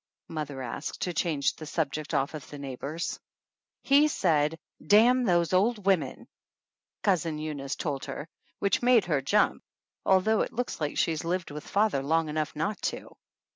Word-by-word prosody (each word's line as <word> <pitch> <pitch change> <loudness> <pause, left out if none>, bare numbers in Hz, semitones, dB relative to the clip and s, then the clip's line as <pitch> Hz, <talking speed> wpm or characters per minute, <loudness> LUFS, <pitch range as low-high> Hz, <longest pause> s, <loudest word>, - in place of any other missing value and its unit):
mother 145 -4 -4
asked, 125 +4 -5
to 180 - -1
change 155 -4 0
the 155 - -8
subject 150 -1 -2
off 135 +3 0
of 155 -3 -8
the 145 - -8
neigh 135 -2 -6
bors. 155 +7 -4 0.6
"He 285 +2 +5
said, 165 - +1 0.3
'Damn 235 +8 +5
those 175 -3 +2
old 205 +2 +2
women!' 195 -3 +1 0.4
' - - -64
Cousin 170 -6 +1
Eunice 150 -3 -4
told 140 -4 -3
her, 150 - -6 0.3
which 200 -1 +1
made 245 -4 +5
her 150 -6 +1
jump, 205 +10 +2 0.4
although 195 +3 +3
it - - -2
looks 245 -7 -3
like 150 -1 -2
she - - +2
has 155 - -3
lived 175 -1 -2
with 150 0 -8
father 205 -9 +2
long 160 +3 +1
enough 155 0 -2
not 180 +8 -2
to. - - -4
165 Hz, 175 wpm, -28 LUFS, 150-200 Hz, 0.6 s, He